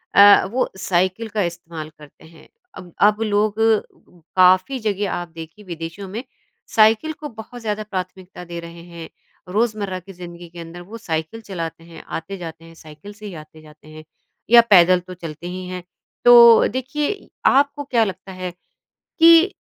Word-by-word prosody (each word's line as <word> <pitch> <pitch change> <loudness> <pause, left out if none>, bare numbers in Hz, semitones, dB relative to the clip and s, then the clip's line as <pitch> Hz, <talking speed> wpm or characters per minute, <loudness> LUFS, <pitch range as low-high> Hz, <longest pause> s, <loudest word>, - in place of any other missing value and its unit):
अ, 200 -1 +8
वो 255 +2 0
साइकिल 185 +4 -1
का 215 -1 -2
इस्तेमाल 170 -2 -6
करते 150 +1 -17
हैं। 160 0 -18 0.3
अब 175 -2 -12
अब 210 +1 +4
लोग 210 -1 +1 0.8
काफ़ी 185 +8 +4
जगह 205 -3 -2
आप 175 0 -4
देखिए 165 +6 -11
विदेशों 170 +2 -7
में 215 +6 -6 0.5
साइकिल 220 +8 +4
को 300 -1 -8
बहुत 225 +1 -11
ज़्यादा 215 -1 -3
प्राथमिकता 185 -2 -7
दे 170 0 -7
रहे 170 0 -11
हैं। 165 -1 -9 0.4
रोज़मर्रा 210 -4 -1
की 195 +2 -14
ज़िंदगी 175 -1 -11
के 175 - -12
अंदर 170 +1 -9
वो 230 - -7
साइकिल 165 +1 -4
चलाते 165 -3 -6
हैं, 165 0 -13
आते-जाते 165 -2 -7
हैं 165 - -15
साइकिल 155 +6 -12
से 215 +1 -13
ही 200 - -7
आते-जाते 155 0 -18
हैं 155 0 -12 0.5
या 235 0 +9
पैदल 180 0 +6
तो - - -6
चलते 160 +1 -7
ही 185 +1 -6
हैं। 180 -1 -6 0.4
तो 245 - +9 0.3
देखिए 285 - -4 0.2
आपको 285 +1 +3
क्या 245 -5 +1
लगता 190 -1 -7
है 180 -1 -4 0.7
कि 335 +3 +6
185 Hz, 160 wpm, -20 LUFS, 170-215 Hz, 0.8 s, या